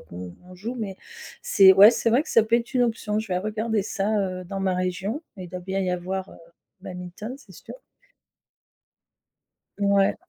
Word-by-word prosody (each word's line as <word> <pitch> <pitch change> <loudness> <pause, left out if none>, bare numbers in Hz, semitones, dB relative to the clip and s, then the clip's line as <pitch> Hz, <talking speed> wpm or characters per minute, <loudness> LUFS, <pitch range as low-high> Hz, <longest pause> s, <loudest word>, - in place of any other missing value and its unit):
qu'on 90 0 -10 0.2
on 185 - -12
joue 230 +7 -5
mais 205 -5 -5 0.4
c'est 195 - +6
ouais, 205 +4 +8
c'est 230 - 0
vrai 265 +7 +3
que - - -12
ça 230 - +5
peut 230 +2 +2
être 240 +3 -5
une 250 - +3
option. 220 -2 -1
Je 220 - -8
vais 180 - 0
regarder 215 +1 -1
ça, 205 -1 -2
heu, 185 -2 -2
dans 195 +2 -6
ma 190 -1 0
région, 190 - -2
il 180 -2 -8
doit 180 0 -6
bien 190 +2 -3
y 185 -2 0
avoir, 185 +2 -4
heu, - - -13 0.5
du - - -20
badminton, 180 +5 -7
c'est - - -17
sûr. - - -11 2.1
Ouais. 200 -1 +3
195 Hz, 195 wpm, -24 LUFS, 185-220 Hz, 2.1 s, ouais